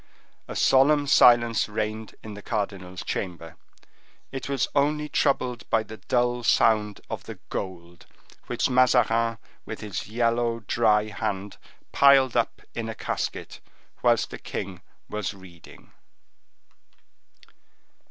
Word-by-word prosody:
A -, -, -7 dB
solemn 145 Hz, +2 st, +4 dB
silence 120 Hz, -5 st, +5 dB
reigned 110 Hz, +1 st, -4 dB
in 110 Hz, -, -8 dB
the 105 Hz, -, -9 dB
cardinal's 95 Hz, -3 st, -4 dB
chamber. 85 Hz, -3 st, -5 dB, 0.8 s
It 135 Hz, 0 st, -6 dB
was 135 Hz, -3 st, 0 dB
only 150 Hz, +1 st, +1 dB
troubled 130 Hz, -5 st, 0 dB
by 110 Hz, -, +2 dB
the 110 Hz, +1 st, -10 dB
dull 120 Hz, 0 st, 0 dB
sound 110 Hz, -3 st, +2 dB
of -, -, -6 dB
the -, -, -8 dB
gold, 85 Hz, -2 st, -6 dB, 0.4 s
which -, -, 0 dB
Mazarin, 115 Hz, -2 st, +3 dB, 0.3 s
with 110 Hz, -, -7 dB
his 105 Hz, -4 st, -5 dB
yellow, 115 Hz, +1 st, 0 dB
dry 110 Hz, -1 st, +2 dB
hand, 100 Hz, -1 st, -4 dB, 0.3 s
piled 135 Hz, -3 st, +5 dB
up 120 Hz, -1 st, 0 dB
in 115 Hz, -1 st, -4 dB
a 110 Hz, -, -5 dB
casket, -, -, -4 dB, 0.4 s
whilst -, -, +2 dB
the -, -, -7 dB
king 95 Hz, -2 st, -6 dB, 0.3 s
was 105 Hz, -1 st, -4 dB
reading. 90 Hz, -3 st, -16 dB
115 Hz, 120 wpm, -25 LUFS, 105-125 Hz, 0.8 s, silence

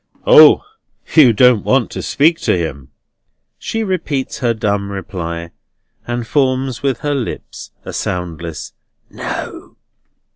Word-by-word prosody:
"O! -, -, +8 dB, 0.5 s
you 145 Hz, -7 st, +7 dB
don't 120 Hz, 0 st, +4 dB
want 130 Hz, -2 st, +1 dB
to -, -, -5 dB
speak 160 Hz, +3 st, +2 dB
to 165 Hz, -, +1 dB
him?" 70 Hz, -6 st, -5 dB, 0.7 s
She 225 Hz, 0 st, -3 dB
repeats 165 Hz, -9 st, -3 dB
her 120 Hz, -3 st, +1 dB
dumb 100 Hz, -3 st, -1 dB
reply, 85 Hz, -3 st, -5 dB, 0.6 s
and 120 Hz, 0 st, -3 dB
forms 130 Hz, -1 st, 0 dB
with 135 Hz, -2 st, -1 dB
her 145 Hz, -1 st, -1 dB
lips 130 Hz, -5 st, -5 dB, 0.2 s
a -, -, -7 dB
soundless 85 Hz, -3 st, -5 dB, 0.4 s
"No." -, -, -7 dB
120 Hz, 120 wpm, -17 LUFS, 90-140 Hz, 0.7 s, O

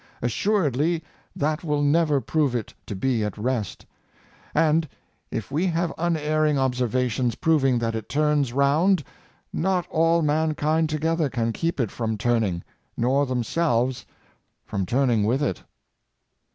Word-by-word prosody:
As 120 Hz, -, -1 dB
suredly 165 Hz, -, +1 dB, 0.3 s
that 150 Hz, +3 st, -1 dB
will 150 Hz, -3 st, 0 dB
never 150 Hz, 0 st, +3 dB
prove 145 Hz, -2 st, 0 dB
it 115 Hz, -4 st, -4 dB
to 105 Hz, -, -4 dB
be 120 Hz, +2 st, 0 dB
at 105 Hz, -1 st, -3 dB
rest; 110 Hz, -3 st, -3 dB, 0.7 s
and 160 Hz, -1 st, +3 dB, 0.4 s
if 115 Hz, +3 st, -5 dB
we 160 Hz, +7 st, +1 dB
have 170 Hz, -1 st, 0 dB
unerring 155 Hz, -3 st, +1 dB
observations 125 Hz, -2 st, 0 dB
proving 135 Hz, -6 st, +2 dB
t?iat 115 Hz, -1 st, -1 dB
it 110 Hz, +1 st, -5 dB
turns 145 Hz, -1 st, +1 dB
round, 150 Hz, +7 st, +3 dB, 0.5 s
not 185 Hz, 0 st, 0 dB
all 165 Hz, +1 st, +3 dB
mankind 155 Hz, +1 st, +1 dB
together 160 Hz, 0 st, 0 dB
can 115 Hz, -3 st, -1 dB
keep 165 Hz, +2 st, -2 dB
it 115 Hz, -6 st, 0 dB
from 110 Hz, -2 st, -2 dB
turn 120 Hz, +2 st, +2 dB
ing, 90 Hz, -4 st, -2 dB, 0.3 s
nor 135 Hz, +4 st, +2 dB
themselves 125 Hz, 0 st, 0 dB, 0.6 s
from 95 Hz, -2 st, -3 dB
turning 120 Hz, -3 st, +2 dB
with 125 Hz, +7 st, +1 dB
it.'' 95 Hz, -, -1 dB
140 Hz, 140 wpm, -24 LUFS, 120-160 Hz, 0.7 s, never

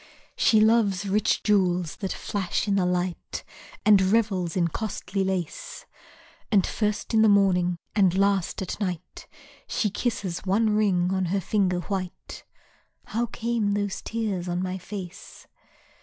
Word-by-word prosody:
She 220 Hz, -, +4 dB
loves 215 Hz, -3 st, +3 dB
rich 205 Hz, +2 st, +1 dB
jewels 180 Hz, -5 st, +1 dB
that 195 Hz, -2 st, -3 dB
flash 195 Hz, 0 st, -2 dB
in 200 Hz, -, +2 dB
the 190 Hz, -2 st, +2 dB
light, 180 Hz, -1 st, -2 dB, 0.4 s
And 205 Hz, -2 st, +7 dB
revels 190 Hz, -4 st, +1 dB
in 170 Hz, -2 st, +2 dB
costly 195 Hz, 0 st, -3 dB
lace, 190 Hz, -4 st, -4 dB, 0.7 s
And 200 Hz, -4 st, +4 dB
first 210 Hz, +1 st, -2 dB
in 220 Hz, -, +5 dB
the 220 Hz, -, +6 dB
morning, 180 Hz, -3 st, +3 dB, 0.2 s
and 190 Hz, -3 st, +3 dB
last 195 Hz, -1 st, +1 dB
at 185 Hz, -, -5 dB
night 180 Hz, -4 st, -5 dB, 0.4 s
She 210 Hz, -, 0 dB
kisses 205 Hz, -6 st, -2 dB
one 210 Hz, +3 st, +2 dB
ring 190 Hz, -4 st, +2 dB
on 190 Hz, -1 st, 0 dB
her 190 Hz, +3 st, 0 dB
finger 185 Hz, -2 st, 0 dB
white; 185 Hz, -2 st, -5 dB, 0.6 s
(How 235 Hz, +2 st, -1 dB
came 230 Hz, -3 st, -1 dB
those 205 Hz, -1 st, -2 dB
tears 210 Hz, -6 st, -3 dB
on 175 Hz, +1 st, -1 dB
my 185 Hz, 0 st, -3 dB
face?) 185 Hz, -1 st, -9 dB
195 Hz, 140 wpm, -26 LUFS, 180-210 Hz, 0.7 s, And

